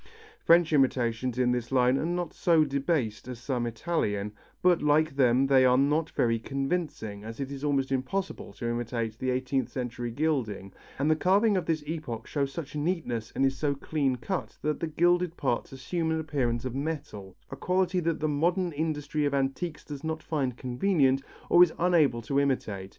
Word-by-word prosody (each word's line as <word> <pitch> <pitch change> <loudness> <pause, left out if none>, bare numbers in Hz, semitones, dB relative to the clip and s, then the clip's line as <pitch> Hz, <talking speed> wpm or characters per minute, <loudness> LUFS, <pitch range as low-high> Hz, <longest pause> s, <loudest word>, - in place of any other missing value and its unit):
French 170 -1 +5
imitations 125 -3 +1
in 125 -1 +2
this 125 0 -2
line 125 -1 +4
are - - -1
not 175 -1 -2
so 165 -3 +3
debased 140 -5 -1
as 125 -1 -6
some 120 0 -2
Italian, 105 -5 -2 0.3
but 180 -2 +4
like 150 0 +2
them 130 -1 +4
they 135 -1 +5
are 125 0 +5
not 150 +4 +2
very 115 -1 +1
convincing, 135 - -3
as 115 +3 -8
it 135 0 -4
is 140 0 -7
almost 140 -2 0
impossible 135 +9 -2
to 120 - -5
imitate 120 -1 -2
the 130 - -3
French 125 - +2
eighteenth 130 -1 -1
century 120 -2 -4
gilding, 115 -8 -2 0.2
and 145 +3 +2
the - - +4
carving 200 +6 +3
of 185 - -1
this 160 -2 0
epoch 145 -8 -5
shows 140 -2 -2
such 150 -1 -7
neatness 150 -8 -2
and 135 - +2
is 135 0 +1
so 140 +1 0
clean 140 -2 -1
cut 185 +9 -4
that 150 0 -1
the 165 - -2
gilded 175 +2 +2
parts 120 -4 -1
assume 160 +5 -3
an 160 0 0
appearance 130 -6 -1
of 130 - -3
metal, 135 - -5 0.2
a - - -4
quality 180 +4 +1
that 165 -2 -1
the 155 - 0
modern 175 +5 +1
industry 150 -1 -2
of 140 -1 0
antiques 140 +4 -2
does 145 -1 -8
not 160 0 -3
find 135 -6 -2
convenient 135 +1 +2 0.3
or 175 - +6
is 180 -2 +6
unable 160 -9 +3
to 140 +5 +1
imitate. 105 -9 -1
140 Hz, 190 wpm, -28 LUFS, 125-160 Hz, 0.3 s, or